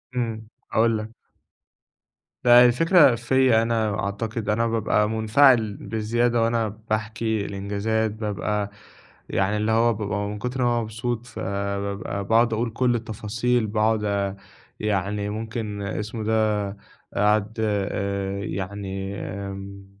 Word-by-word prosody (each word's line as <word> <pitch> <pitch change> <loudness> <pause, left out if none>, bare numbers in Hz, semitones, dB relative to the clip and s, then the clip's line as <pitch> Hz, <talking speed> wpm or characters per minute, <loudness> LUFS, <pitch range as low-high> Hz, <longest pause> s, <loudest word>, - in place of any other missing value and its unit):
امم، 110 -3 -2 0.2
هاقول 115 0 +3
لك. 110 +1 -7 1.3
لأ، 120 0 +8
الفكرة 145 +1 +5
فيا 120 -1 +3
أنا 110 -2 0
أعتقد 110 +2 -3
أنا 115 +2 +2
بابقى 110 -1 +1
مُنفَعل 110 -1 +4
بزيادة 115 +2 0
وأنا 115 -1 +1 0.2
باحكي 110 0 -1
الإنجازات، 100 +2 -1
بابقى 105 -1 -2 0.6
يعني 100 +2 +1
اللي 105 +1 0
هو 115 +1 +4
بابقى 105 -1 -2
من 105 0 -5
كُتر 125 +1 -2
ما 120 0 +3
أنا 120 - +1
مبسوط 115 +2 -3
فبابقى 100 -2 -3
باقعد 115 +2 +3
أقول 115 +2 0
كُلّ 120 +1 +1
التفاصيل 110 +1 -1
باقعد 110 0 +1
آآ، 100 -1 -1 0.4
يعني 105 0 -1
ممكن 110 -1 -4
اسمه 110 +2 -4
إيه 110 - -4
ده، 105 -2 +1 0.4
أقعد 105 +1 +2
آآ، 100 -2 -1
يعني 95 +1 -4
آمم، 100 0 -7
110 Hz, 125 wpm, -24 LUFS, 100-115 Hz, 1.3 s, لأ